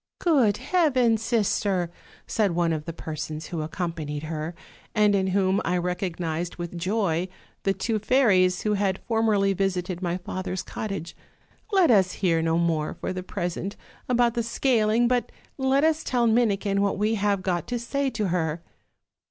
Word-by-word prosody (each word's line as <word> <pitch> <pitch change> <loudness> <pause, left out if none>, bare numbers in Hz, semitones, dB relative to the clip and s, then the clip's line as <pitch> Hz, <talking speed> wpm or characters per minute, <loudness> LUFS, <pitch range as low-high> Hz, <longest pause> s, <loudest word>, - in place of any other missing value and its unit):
'Good 260 - +3
heavens, 255 -6 +2
sister!' 200 -6 0 0.3
said 205 -5 +1
one 170 -1 +2
of 150 -1 -4
the 165 - -4
persons 155 -1 -6
who 165 -3 -3
accompanied 155 -2 -4
her, 155 +1 -4 0.4
and 210 -1 +4
in 190 -1 +2
whom 190 0 +2
I 180 +1 0
recognized 175 -2 -2
with 175 0 -6
joy 185 -1 0 0.3
the 195 - +1
two 220 +1 -1
fairies 195 -7 +3
who 210 - +1
had 195 -2 +1
formerly 215 -4 +2
visited 185 -2 -1
my 175 -1 -1
father's 185 0 -4
cottage, 195 -6 -5 0.6
'let 375 -8 +5
us 190 -4 +4
hear 170 -4 +1
no 165 0 +1
more 165 -3 0
for - - -4
the 185 - -4
present 180 +1 -4 0.3
about 240 -1 +3
the 235 - 0
scaling, 230 -1 +2
but 245 0 0 0.3
let 265 +2 +2
us 320 0 +2
tell 245 -2 +1
Minikin 210 -4 +2
what 200 0 +1
we 210 +2 +1
have 200 -2 0
got 180 -2 -1
to 245 - -2
say 275 +4 -1
to 215 -6 -2
her.' 165 -2 -1
195 Hz, 160 wpm, -25 LUFS, 175-225 Hz, 0.6 s, let